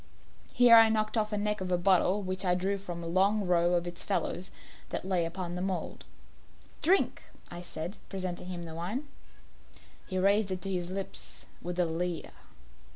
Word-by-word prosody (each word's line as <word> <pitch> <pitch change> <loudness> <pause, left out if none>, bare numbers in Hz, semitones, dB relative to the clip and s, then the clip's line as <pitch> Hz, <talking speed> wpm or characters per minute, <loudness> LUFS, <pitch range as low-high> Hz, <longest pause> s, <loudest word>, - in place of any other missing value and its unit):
Here 240 -2 +8
I 225 0 +8
knocked 215 0 0
off 215 -1 +1
the 210 - -2
neck 210 0 0
of 185 -1 -3
a 180 - +3
bottle 190 +2 +3
which 185 0 -3
I 180 -1 +3
drew 195 +2 -1
from 175 -3 -6
a - - -4
long 195 +4 +2
row 175 0 +3
of 175 0 0
its 175 0 -6
fellows 190 -2 -1 0.4
that - - -3
lay 185 -3 +1
upon 175 +1 -4
the 180 - -3
mould. 190 -1 -3 0.8
"Drink," 370 +6 +3 0.3
I 175 0 -6
said, 175 +2 -6
presenting 185 -2 -4
him 175 -2 -5
the 165 -1 -7
wine. 210 - -4 1.0
He 185 - -3
raised 200 +2 +3
it 185 -1 -3
to 195 - -1
his 175 -1 -2
lips 195 +1 -5 0.2
with 175 0 -4
a 180 - +3
leer. 170 +1 -2
185 Hz, 185 wpm, -30 LUFS, 175-200 Hz, 1.0 s, Here